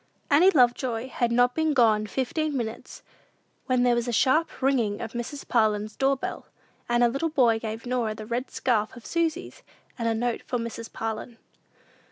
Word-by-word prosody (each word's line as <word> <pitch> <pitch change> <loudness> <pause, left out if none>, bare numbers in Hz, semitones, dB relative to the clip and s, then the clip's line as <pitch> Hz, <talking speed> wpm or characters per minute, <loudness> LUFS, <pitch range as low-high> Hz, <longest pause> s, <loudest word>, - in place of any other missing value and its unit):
Annie 325 +7 +7
Lovejoy 250 -4 +2
had 240 -1 -1
not 245 +1 +3
been 315 0 +1
gone 215 -4 +3
fifteen 280 +5 -2
minutes, 230 -1 -6 0.6
when 255 -2 +2
there 245 -1 +4
was 240 0 -1
a - - -1
sharp 260 +8 +2
ringing 245 -6 +1
of 225 - -5
Mrs. 240 +5 -6
Parlin's 215 -2 +1
doorbell, 270 0 -1 0.4
and 240 0 +3
a - - +6
little 275 +7 -1
boy 240 -7 +3
gave 225 +1 -6
Norah 240 -3 -1
the 215 - -8
red 240 +3 -3
scarf 220 -3 0
of 240 - -13
Susy's, 335 +1 -2 0.4
and 230 - -1
a 225 - +1
note 240 +1 -1
for 250 - -3
Mrs. 230 -1 -6
Parlin. 225 +1 -5
240 Hz, 175 wpm, -26 LUFS, 225-265 Hz, 0.6 s, Annie